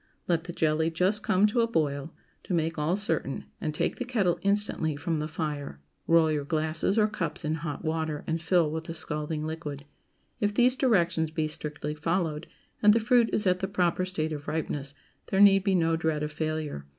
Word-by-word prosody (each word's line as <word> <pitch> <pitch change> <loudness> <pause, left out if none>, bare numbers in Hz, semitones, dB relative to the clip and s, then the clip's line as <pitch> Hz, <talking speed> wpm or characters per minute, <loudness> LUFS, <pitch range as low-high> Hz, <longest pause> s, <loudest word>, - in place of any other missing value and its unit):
Let 170 -1 +1
the 175 - -5
jelly 160 -1 +1
just 185 +6 +1
come 190 +1 +3
to 220 +3 +2
a 230 - +2
boil, 150 -7 -1 0.3
to 180 - -1
make 160 -1 -1
all 155 +4 +1
certain, 165 -9 0 0.2
and 155 - -1
take 155 - -1
the 250 - -2
kettle 220 -9 0
instantly 200 -6 +1
from 160 +3 -2
the 150 0 -2
fire. 150 - -4 0.3
Roll 165 -1 +5
your 150 -2 -1
glasses 160 +6 0
or 215 -1 +5
cups 170 -7 -3
in 155 - 0
hot 150 -2 -5
water, 155 -1 -2
and 165 0 -2
fill 170 -2 +2
with 160 +1 -4
the 165 - -6
scalding 155 -1 -3
liquid. 155 -3 -5 0.5
If 205 0 0
these 250 +2 +4
directions 170 - +2
be 155 -1 -1
strictly 150 -1 -4
followed, 160 0 -1 0.3
and 210 0 +7
the 230 - +3
fruit 235 0 +3
is 210 - +1
at 180 -1 +3
the 190 - -1
proper 185 -2 +1
state 160 -4 -2
of 145 -1 -7
ripeness, 145 -3 -3 0.3
there 190 - 0
need 195 -1 +7
be 195 -1 +2
no 165 -2 +2
dread 160 -2 -1
of 150 - -3
failure. 155 - -3
160 Hz, 200 wpm, -28 LUFS, 155-190 Hz, 0.5 s, and